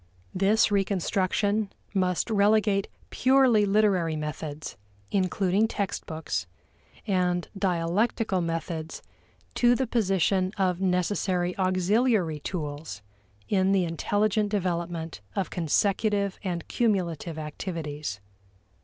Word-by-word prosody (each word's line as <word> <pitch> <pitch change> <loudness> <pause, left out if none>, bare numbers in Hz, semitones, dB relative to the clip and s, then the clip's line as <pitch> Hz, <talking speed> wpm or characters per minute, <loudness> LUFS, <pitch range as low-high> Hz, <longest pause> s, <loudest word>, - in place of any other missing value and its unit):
This 205 +3 +3
reconstruction 200 +1 0 0.2
must 185 +2 0
relegate 205 -1 +3 0.2
purely 255 -5 +4
literary 195 -6 +2
methods 150 0 -5 0.4
including 195 +2 +2
textbooks 160 - -3 0.6
and 180 -3 0
dialectical 190 +2 0
methods 165 -1 -4 0.5
to 245 0 +4
the 260 - 0
position 195 -4 +1
of 185 -2 +1
necessary 180 -1 0
auxiliary 185 -2 +2
tools 150 - -5 0.4
in 190 -1 +2
the 190 -2 +3
intelligent 205 +5 0
development 170 - -2
of 195 - -2
consecutive 200 +4 +1
and 175 -4 -3
cumulative 175 -8 -1
activities. 150 - -5
185 Hz, 90 wpm, -27 LUFS, 170-205 Hz, 0.6 s, purely